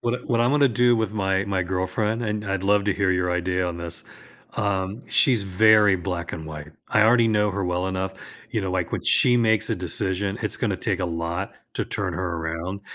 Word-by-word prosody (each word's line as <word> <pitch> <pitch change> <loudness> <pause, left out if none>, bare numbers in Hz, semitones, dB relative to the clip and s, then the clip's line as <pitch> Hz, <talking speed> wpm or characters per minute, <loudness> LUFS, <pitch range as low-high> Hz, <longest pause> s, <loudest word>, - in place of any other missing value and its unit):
What 120 0 -1
I - - -3
what 115 -2 +1
I'm 120 +1 +3
wanna 145 -1 +4
do 120 +1 +3
with 110 -2 -1
my 95 -2 0
my 95 -2 -1
girlfriend 95 +5 -2
and 105 -1 -3
I'd 100 -1 -3
love 100 0 +3
to 100 - +1
hear 100 -1 +1
your 90 -1 0
idea 90 +1 -1
on 85 -1 -4
this. 85 -1 -5 0.5
um, 100 +2 -2
she's 120 -6 +3
very 105 +1 +4
black 90 -2 -5
and 80 -1 -6
white. 75 0 -9 0.2
I 110 - +3
already 115 +1 +4
know 105 -1 +2
her 100 0 -3
well 90 +1 -1
enough, 95 0 -3 0.4
you 110 - -1
know, 95 - -3
like, 90 -2 -2
when - - -2
she 120 -1 +5
makes 110 -3 +3
a - - 0
decision, 95 +2 -1
it's - - +2
gonna - - -1
take - - -1
a - - 0
lot 85 +3 -4 0.2
to - - -2
turn - - -3
her 90 -2 -3
around, 85 +4 -4
95 Hz, 220 wpm, -23 LUFS, 90-110 Hz, 0.5 s, she